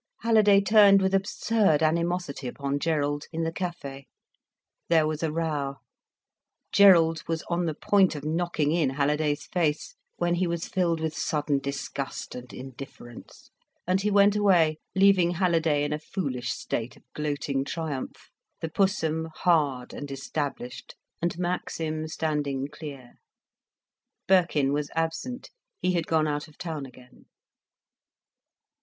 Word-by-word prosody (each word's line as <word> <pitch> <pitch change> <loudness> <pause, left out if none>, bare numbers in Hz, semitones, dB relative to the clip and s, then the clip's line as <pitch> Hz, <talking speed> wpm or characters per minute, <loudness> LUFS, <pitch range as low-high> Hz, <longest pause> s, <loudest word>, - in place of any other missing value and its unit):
Halliday 215 -3 +5
turned 200 0 +6
with 190 0 0
absurd 195 -4 +2
animosity 170 -3 0
upon 140 +3 -3
Gerald, 145 -2 0
in 165 0 -2
the 165 - -1
café. 150 -7 -5 0.8
There 160 -2 +4
was 155 0 -2
a 160 -2 0
row. 150 -4 -2 1.0
Gerald 165 -5 +6
was 165 0 -2
on 170 0 0
the 155 - -2
point 195 -2 +3
of 145 0 -7
knocking 160 -2 0
in 165 -4 +2
Halliday's 145 +2 0
face; 155 -4 -1 0.2
when 175 0 +1
he 175 +1 +1
was 170 0 -3
filled 170 -3 0
with 160 -1 -2
sudden 150 -2 0
disgust 140 0 -5
and 125 0 -9
indifference, 130 -2 -11 0.3
and 185 +2 +1
he 210 - +1
went 200 0 +5
away, 175 -7 +3 0.2
leaving 190 -3 +4
Halliday 165 -5 +2
in 145 0 -1
a 150 - -2
foolish 140 -7 -3
state 115 +1 -4
of - - -22
gloating 145 -2 -2
triumph, 150 -2 -5 0.3
the 165 - -4
Pussum 160 -3 0
hard 145 -8 +1
and 145 - -7
established, 140 -2 -5 0.3
and 170 0 -1
Maxim 165 -3 -2
standing 145 -4 -2
clear. 140 -5 -10 1.1
Birkin 170 -7 +3
was 145 0 -1
absent, 165 +11 -3 0.3
he 180 +1 +1
had 170 -2 -1
gone 155 -1 +2
out 150 +1 -2
of 155 - -20
town 155 -5 -5
again. 125 -1 -18
160 Hz, 135 wpm, -27 LUFS, 145-175 Hz, 1.1 s, turned